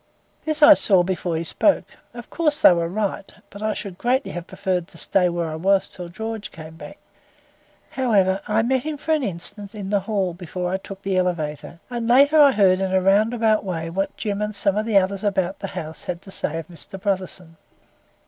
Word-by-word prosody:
This 310 -1 0
I 305 - +11
saw 190 -10 +4
before 175 -2 -2
he 165 - -2
spoke. 290 - +2 0.3
Of 240 -1 -10
course 305 -3 0
they 185 - +7
were 170 -1 -1
right. 200 +1 -3 0.2
But 200 - -10
I 215 0 -1
should 190 -4 -7
greatly 255 +3 0
have 175 0 -7
preferred 180 -3 -2
to - - -16
stay 180 +1 +2
where 170 -1 -2
I 155 - -5
was 195 +4 +2
till 175 -2 -8
George 220 +3 -6
came 160 0 -11
back. 160 - -11 0.9
However, 200 -7 +2
I 220 +1 +2
met 260 +2 +1
him 305 +2 -4
for 315 - -4
an 310 - +1
instant 205 0 -4
in 200 -2 -6
the 205 - +3
hall 195 -3 -2
before 180 +1 -4
I - - +1
took 195 0 -11
the 195 -1 0
elevator, 170 -3 -2
and 240 -2 -4
later 280 +6 +5
I 285 -1 +7
heard 190 -3 +3
in 190 -1 -1
a 190 - +3
round 200 +4 +3
about 225 -3 +1
way 165 -4 -4
what 195 +3 -3
Jim 205 -2 -3
and 210 0 -3
some 200 -1 +1
others 200 -2 +1
about 190 -2 -1
the 195 - -4
house 160 -3 -7
had 175 0 -5
to 195 - -12
say 160 -3 -2
of 165 -1 -6
Mr. 175 +3 -10
Brotherson. 185 -4 -4
195 Hz, 210 wpm, -22 LUFS, 180-220 Hz, 0.9 s, I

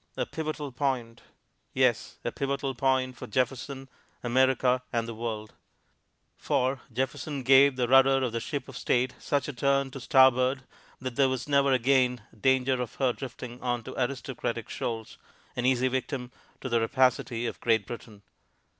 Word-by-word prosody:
A - - 0
pivotal 155 -3 -4
point! 125 -3 -2 0.5
Yes, - - +1
a - - 0
pivotal 140 0 -2
point 130 0 +1
for - - -8
Jefferson, 135 +1 -2 0.4
America 130 0 +3
and 115 -1 -1
the 115 - -5
world; 110 -2 -5 0.8
for 130 -2 0
Jefferson 135 +3 -3
gave 135 +1 +6
the 125 -1 0
rudder 135 +1 +5
of 125 - 0
the 115 - -2
Ship 140 +4 -4
of 135 - -10
State 125 +1 +1
such 145 -2 -1
a 150 - -4
turn 140 +1 +1
to 135 - -7
starboard 130 -1 +4 0.4
that 130 -1 -5
there 135 -1 +4
was 130 0 -3
never 140 -1 +3
again 125 -2 +2
danger 130 -1 +2
of 125 - -5
her 130 -3 +1
drifting 125 -1 -8
on 120 -2 -1
to - - -8
aristocratic 130 0 -3
shoals, 115 -2 -5 0.4
an 125 0 0
easy 130 0 +3
victim 130 -1 -3 0.3
to - - -4
the 115 -1 +2
rapacity 120 -1 +1
of - - -4
Great 110 -3 +2
Britain. 110 -3 -9
130 Hz, 160 wpm, -28 LUFS, 120-135 Hz, 0.8 s, gave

